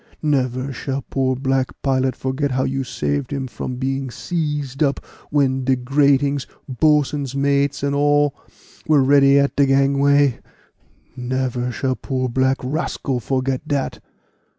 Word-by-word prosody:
Never 130 -2 0
shall 135 +2 -4
poor 130 -1 +1
black 135 0 -1
pilot 130 -2 +1
forget 130 +2 -2
how 130 0 0
you 135 0 -1
saved 70 - -2
him 140 -2 -2
from 125 0 -5
being 135 +1 -2
seized 150 -2 -3
up, 140 -3 +2 0.3
when 135 -3 +1
de 130 +1 +2
gratings, 140 +1 +1 0.2
boatswain's 145 0 +1
mates, 140 0 +1
and 140 0 0
all, 145 0 +3 0.5
were 150 -3 +4
ready 140 0 +5
at 140 0 +2
de 140 -1 +3
gangway 140 0 +3 0.8
never 125 -1 -2
shall 130 +1 -1
poor 130 -1 -2
black 130 +2 +1
rascal 135 -2 -2
forget 130 +3 -2
dat." 140 -3 -2
135 Hz, 135 wpm, -20 LUFS, 130-140 Hz, 0.8 s, ready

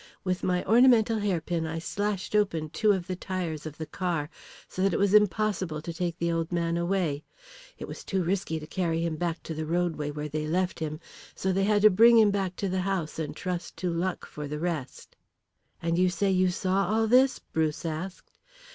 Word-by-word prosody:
With 185 -1 -1
my 180 -1 0
ornamental 230 0 +5
hairpin 175 -4 -1
I 160 +1 -4
slashed 205 +4 -2
open 165 -7 +1
two 215 -2 +3
of 190 -3 0
the 185 0 -3
tyres 175 -5 -4
of 150 - -9
the 160 - -4
car, 170 -3 -2 0.4
so 185 - -5
that 195 -2 +2
it - - +1
was 200 0 +2
impossible 205 -5 +2
to 165 +2 -6
take 170 0 -2
the 170 -1 0
old 165 0 -1
man 170 -1 0
away. 170 -4 0 0.5
It - - -7
was - - -8
too 190 -2 -1
risky 175 -2 -1
to 155 - -8
carry 165 -1 -1
him 165 -2 -1
back 170 +1 -3
to 160 - -5
the 155 0 -4
roadway 165 -3 -1
where 150 +1 -4
they 155 +1 -3
left 180 +3 0
him, 155 -1 -4 0.4
so 190 - -1
they 195 +1 +1
had 210 0 +2
to 215 - +8
bring 230 +5 +7
him 215 -2 +6
back 190 -2 -1
to 200 - -2
the 185 0 -1
house 180 -5 -2
and 155 -2 -4
trust 180 -2 -4
to 180 -2 -1
luck 175 +2 -2
for 150 -1 -7
the 150 +1 -4
rest." 160 -5 -4 0.7
"And 170 +1 +1
you 185 0 +4
say 195 +2 0
you 185 0 +3
saw 190 +2 0
all 220 +1 +2
this?" 255 +4 +4
Bruce 160 0 -2
asked. 165 +4 -5
180 Hz, 210 wpm, -28 LUFS, 160-195 Hz, 0.7 s, to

